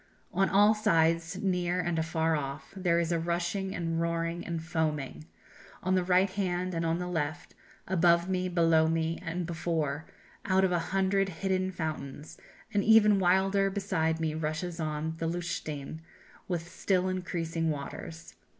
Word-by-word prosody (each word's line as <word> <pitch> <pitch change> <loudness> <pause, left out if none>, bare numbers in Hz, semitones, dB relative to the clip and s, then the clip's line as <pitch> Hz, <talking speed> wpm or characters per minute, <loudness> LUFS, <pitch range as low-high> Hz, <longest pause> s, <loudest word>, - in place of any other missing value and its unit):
On 195 +2 +2
all 205 +2 +6
sides, 165 -4 +2
near 180 -2 +1
and 175 -2 0
afar 160 0 +1
off, 140 0 -5
there 175 -3 +2
is 170 0 0
a 170 - +1
rushing 175 +3 -2
and 165 -1 -1
roaring 170 0 -1
and 170 -1 -3
foaming, 155 - -2 0.6
on 185 - +1
the 185 -1 +3
right 185 +1 +3
hand 185 -2 -1
and 165 0 -1
on 165 0 +1
the 180 - -3
left, 160 -2 -3 0.3
above 170 -1 +3
me, 185 -1 -1
below 165 -2 +4
me, 165 0 0
and 175 0 -3
before, 160 -3 -2 0.4
out 190 0 +2
of 190 - +3
a 175 - +2
hundred 195 0 +2
hidden 185 +1 -1
fountains, 155 -3 -5 0.3
and 200 -1 +2
even 210 -2 +6
wilder 195 +2 +3
beside 185 -5 0
me 160 -1 -1
rushes 160 +3 -3
on 155 0 -2
the 165 - -1
Lutschine, 160 -3 -4 0.5
with 175 -2 -3
still 185 +1 0
increasing 165 -3 -2
waters. 155 +2 -6
170 Hz, 155 wpm, -30 LUFS, 160-185 Hz, 0.6 s, all